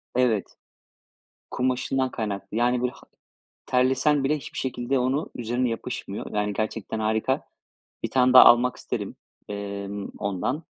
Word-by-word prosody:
Evet, 120 -5 +1 1.0
kumaşından 130 +1 0
kaynaklı, 105 -1 -4
yani, 120 +1 +2
böyle 125 - 0
ha - - -17 0.6
terlesen 130 +3 +2
bile 150 +3 +2
hiçbir 140 - -10
şekilde 130 0 -1
onu, 130 +5 0
üzerine 120 +1 -1
yapışmıyor. 115 -3 -5
Yani, 105 0 0
gerçekten 110 +1 -3
harika. 110 +5 0 0.6
Bir - - -2
tane 130 -1 +4
daha 130 - +11
almak 120 +1 +6
isterim, - - -4 0.3
emm, 100 0 -5
ondan. 100 - -2
125 Hz, 130 wpm, -25 LUFS, 110-130 Hz, 1.0 s, daha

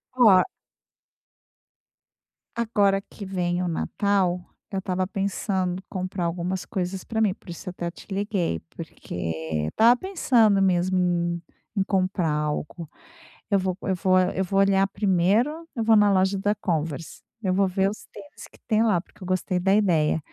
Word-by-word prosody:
Oh 215 -7 +6 2.2
Agora 205 -4 +2
que 205 - -10
vem 180 -2 -1
o 180 - -1
Natal, 180 +1 0 0.3
eu 195 - -1
estava 185 -1 -1
pensando, 190 -1 -2
comprar 185 -1 -3
algumas 175 +2 -2
coisas 185 0 -3
pra 220 -1 -2
mim, 210 -3 +3
por 180 - -12
isso 170 - -7
até 175 -1 -4
te - - -15
liguei. 195 - -1 0.2
Porque 80 -2 -4
estava 235 +2 +5
pensando 245 - +2
mesmo 185 0 +2
em 175 -1 0 0.4
em - - +3
comprar 185 -4 0
algo. 150 +2 -3 0.6
Eu 200 - +4
vou 185 -1 -1
eu 190 - 0
vou 185 0 +3
eu 185 +1 +1
vou 195 +1 -1
olhar. 195 0 +4
Primeiro, 210 - +1
eu 230 - -1
vou 225 0 +5
na 210 -1 +5
loja 190 +1 +2
da 205 +2 +1
Converse, 165 -6 -3 0.2
eu 190 -3 +1
vou 195 +1 +2
ver 190 +1 +1
os 215 - -10
tênis 195 -1 -12
que - - -20
tem 215 0 +2
lá, 210 -6 +3
porque 190 - -22
eu - - -6
gostei 185 0 0
da 195 +2 +3
ideia. 170 -8 +2
190 Hz, 160 wpm, -25 LUFS, 175-200 Hz, 2.2 s, Oh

